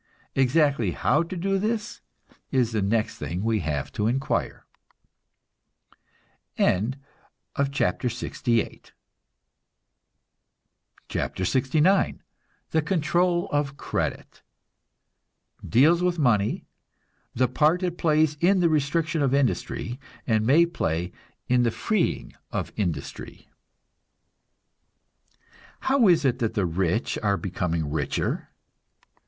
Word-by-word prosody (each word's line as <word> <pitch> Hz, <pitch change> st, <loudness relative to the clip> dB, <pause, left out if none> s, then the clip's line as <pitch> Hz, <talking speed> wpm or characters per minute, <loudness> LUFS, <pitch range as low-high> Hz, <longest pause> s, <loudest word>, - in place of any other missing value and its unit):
Exactly 135 Hz, -, +2 dB
how 150 Hz, -, +2 dB
to 170 Hz, +2 st, -5 dB
do 195 Hz, +2 st, 0 dB
this 215 Hz, 0 st, -2 dB, 0.5 s
is 125 Hz, -4 st, +1 dB
the 110 Hz, -2 st, 0 dB
next 105 Hz, +3 st, 0 dB
thing 90 Hz, +3 st, -4 dB
we 110 Hz, -1 st, +1 dB
have 75 Hz, -5 st, -3 dB
to 105 Hz, -1 st, -1 dB
inquire. 135 Hz, +4 st, -1 dB, 1.9 s
CHAPTER 135 Hz, +1 st, -1 dB
LXIX 120 Hz, 0 st, -5 dB, 2.6 s
THE 150 Hz, -, 0 dB
CONTROL 175 Hz, +2 st, +1 dB
OF 145 Hz, -1 st, -1 dB
CREDIT -, -, -4 dB, 1.2 s
(Deals 155 Hz, +9 st, +4 dB
with 180 Hz, -1 st, +1 dB
money, 115 Hz, -9 st, +1 dB, 0.7 s
the 125 Hz, +1 st, +3 dB
part 155 Hz, +8 st, +2 dB
it 175 Hz, -1 st, -2 dB
plays 155 Hz, -1 st, +2 dB
in 190 Hz, +2 st, +4 dB
the 170 Hz, -2 st, +3 dB
restriction 155 Hz, +1 st, 0 dB
of 135 Hz, -1 st, +2 dB
industry, 130 Hz, -2 st, -1 dB, 0.3 s
and 110 Hz, -2 st, +2 dB
may 145 Hz, +9 st, +5 dB
play 85 Hz, -, -2 dB, 0.4 s
in 125 Hz, 0 st, +3 dB
the 120 Hz, -, +3 dB
freeing 215 Hz, -, -1 dB, 0.2 s
of -, -, -3 dB
industry.) -, -, -5 dB, 2.3 s
How 265 Hz, -4 st, +3 dB
is 170 Hz, -5 st, +4 dB
it 125 Hz, -1 st, +1 dB
that 115 Hz, -3 st, -1 dB
the 100 Hz, -, +1 dB
rich 90 Hz, +5 st, -1 dB
are 100 Hz, -2 st, +1 dB
becoming 85 Hz, -6 st, -2 dB
richer? 75 Hz, -3 st, -2 dB
135 Hz, 100 wpm, -25 LUFS, 110-165 Hz, 2.6 s, may